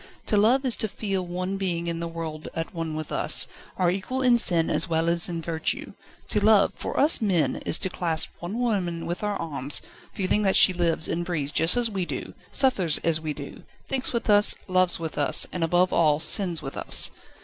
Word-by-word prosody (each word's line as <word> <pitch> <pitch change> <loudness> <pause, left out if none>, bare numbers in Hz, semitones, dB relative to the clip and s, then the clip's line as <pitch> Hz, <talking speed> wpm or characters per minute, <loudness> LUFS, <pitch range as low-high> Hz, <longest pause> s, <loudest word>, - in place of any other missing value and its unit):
To - - 0
love 240 +7 +3
is 250 - +3
to 220 - 0
feel 195 -2 -4
one 180 +2 -4
being 175 -3 -2
in 170 -1 -3
the 170 - -4
world 165 -2 -7
at 165 0 -5
one 165 -2 -5
with 155 -1 -6
us, - - +2 0.3
our 180 -2 +1
equal 255 +8 -3
in 245 -2 +4
sin 170 -7 +4
as - - +1
well 165 0 0
as 170 +1 +4
in 165 -1 -5
virtue. 160 0 -4 0.4
To 205 - +1
love, 215 -1 +4
for - - -5
us 295 -1 +5
men, 180 -10 0
is - - +4
to 185 - -2
clasp 165 -3 -1
one 180 +6 -6
woman 185 -8 -2
with 175 +4 -5
our 210 -1 -2
arms, 145 -3 -1 0.3
feeling 195 +2 -1
that 195 -2 +1
she 185 - +7
lives 170 -2 0
and 170 +1 -3
breathes 155 -5 -3
just 165 +10 +1
as 235 -2 +1
we 190 -3 -3
do, - - -7 0.2
suffers 200 - +2
as 160 -1 +1
we 155 -1 -4
do, 140 -1 -10 0.3
thinks 265 -1 0
with 235 - -3
us, 205 -1 +6
loves 185 -1 +2
with 160 -2 -5
us, 145 - +6
and, 180 - -3
above 175 +3 +1
all, 150 -3 +2
sins 170 0 +2
with 135 - -7
us. - - +2
175 Hz, 215 wpm, -24 LUFS, 165-205 Hz, 0.4 s, she